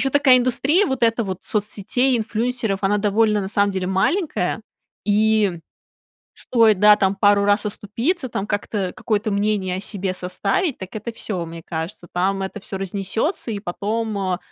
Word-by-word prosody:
ещё 270 Hz, -, +1 dB
такая 275 Hz, -3 st, +5 dB
индустрия, 265 Hz, -, +2 dB
вот 265 Hz, -2 st, -3 dB
эта 230 Hz, 0 st, +3 dB
вот 190 Hz, -1 st, -5 dB
соцсетей, 220 Hz, +5 st, 0 dB
инфлюенсеров, 225 Hz, -2 st, -1 dB
она 205 Hz, +1 st, +2 dB
довольно, 210 Hz, +1 st, +2 dB
на 190 Hz, -, -4 dB
самом 200 Hz, 0 st, +2 dB
деле, 190 Hz, -1 st, -2 dB
маленькая. 205 Hz, -, 0 dB, 0.4 s
И 210 Hz, -4 st, +2 dB, 0.7 s
стоит, 225 Hz, -5 st, +3 dB
да, 210 Hz, 0 st, +8 dB
там 195 Hz, -1 st, +1 dB
пару 200 Hz, 0 st, +4 dB
раз 205 Hz, +1 st, +2 dB
оступиться, 235 Hz, -, -2 dB
там 200 Hz, -4 st, -3 dB
как-то 205 Hz, -2 st, -2 dB
какое-то 215 Hz, -1 st, -1 dB
мнение 200 Hz, -2 st, 0 dB
о -, -, -3 dB
себе 195 Hz, -1 st, -2 dB
составить, 185 Hz, -, -1 dB
так 190 Hz, -, -8 dB
это 215 Hz, +2 st, -4 dB
всё, 185 Hz, -6 st, -4 dB
мне 165 Hz, 0 st, -9 dB
кажется, 165 Hz, +2 st, -5 dB
там 195 Hz, +2 st, 0 dB
это 190 Hz, +2 st, -5 dB
всё 195 Hz, 0 st, -6 dB
разнесётся, 200 Hz, -, -2 dB
и 205 Hz, -, -3 dB
потом, 215 Hz, +3 st, -3 dB
э, 185 Hz, -2 st, -1 dB
205 Hz, 165 wpm, -21 LUFS, 190-230 Hz, 0.7 s, да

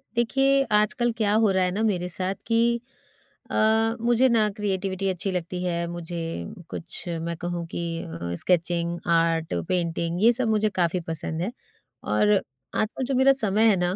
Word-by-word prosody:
देखिए, 270 Hz, +3 st, +3 dB
आजकल 215 Hz, +3 st, +2 dB
क्या 210 Hz, -2 st, +2 dB
हो 220 Hz, -1 st, +4 dB
रहा 190 Hz, -1 st, +2 dB
है 180 Hz, -, +1 dB
ना 200 Hz, +4 st, -2 dB
मेरे 180 Hz, -5 st, 0 dB
साथ 185 Hz, +2 st, -2 dB
कि 235 Hz, +1 st, +2 dB, 0.7 s
अ, 220 Hz, +1 st, +3 dB
मुझे 240 Hz, +2 st, +4 dB
ना 225 Hz, -3 st, +3 dB
क्रिएटिविटी 195 Hz, -1 st, -1 dB
अच्छी 190 Hz, +1 st, -2 dB
लगती 180 Hz, 0 st, -3 dB
है, 170 Hz, -1 st, -1 dB
मुझे 175 Hz, 0 st, -5 dB, 0.5 s
कुछ 170 Hz, -, -7 dB, 0.2 s
मैं 170 Hz, +1 st, -3 dB
कहूँ 175 Hz, 0 st, -3 dB
कि -, -, -5 dB, 0.2 s
अ, 85 Hz, +1 st, -5 dB
स्केचिंग, 170 Hz, -1 st, 0 dB
आर्ट, 165 Hz, -1 st, +2 dB, 0.2 s
पेंटिंग 170 Hz, 0 st, -1 dB
ये 235 Hz, -, +7 dB
सब 245 Hz, 0 st, 0 dB
मुझे 215 Hz, 0 st, +2 dB
काफ़ी 175 Hz, 0 st, +1 dB
पसंद 160 Hz, 0 st, -3 dB
हैं। 195 Hz, +6 st, -2 dB, 0.5 s
और 105 Hz, 0 st, +2 dB, 0.4 s
आजकल 220 Hz, +4 st, -1 dB
जो 270 Hz, -, -2 dB
मेरा 265 Hz, +2 st, +6 dB
समय 215 Hz, +1 st, +3 dB
है 205 Hz, -, +4 dB
ना, 180 Hz, +1 st, 0 dB
185 Hz, 170 wpm, -25 LUFS, 170-220 Hz, 0.7 s, ये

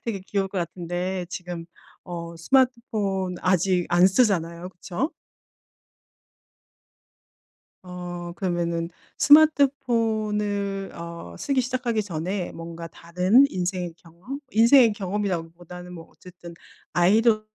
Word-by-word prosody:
되게 215 Hz, -5 st, -3 dB
귀여울 195 Hz, 0 st, -2 dB
것 195 Hz, -, -8 dB
같은데 175 Hz, +2 st, -3 dB
지금 175 Hz, -2 st, -6 dB, 0.4 s
어 170 Hz, -1 st, -6 dB
스마트폰 210 Hz, -4 st, +1 dB
아직 185 Hz, -1 st, +2 dB
안 175 Hz, +1 st, +6 dB
쓰잖아요 180 Hz, -5 st, +1 dB
그쵸? 190 Hz, -, -3 dB, 2.8 s
어 175 Hz, -1 st, -6 dB
그러면은 170 Hz, -2 st, -1 dB, 0.3 s
스마트폰을 220 Hz, -9 st, +3 dB
어 170 Hz, -, -8 dB
쓰기 275 Hz, -2 st, +1 dB
시작하기 245 Hz, -3 st, -1 dB
전에 180 Hz, +1 st, -3 dB
뭔가 165 Hz, 0 st, -8 dB
다른 180 Hz, -, +3 dB
인생의 180 Hz, -1 st, -2 dB
경험 180 Hz, -, -9 dB
인생의 230 Hz, 0 st, +6 dB
경험이라기보다는 180 Hz, -3 st, -4 dB
뭐 165 Hz, -2 st, -10 dB
어쨌든 175 Hz, -2 st, -13 dB, 0.4 s
아이들 215 Hz, +5 st, +4 dB
185 Hz, 240 characters per minute, -24 LUFS, 175-215 Hz, 2.8 s, 안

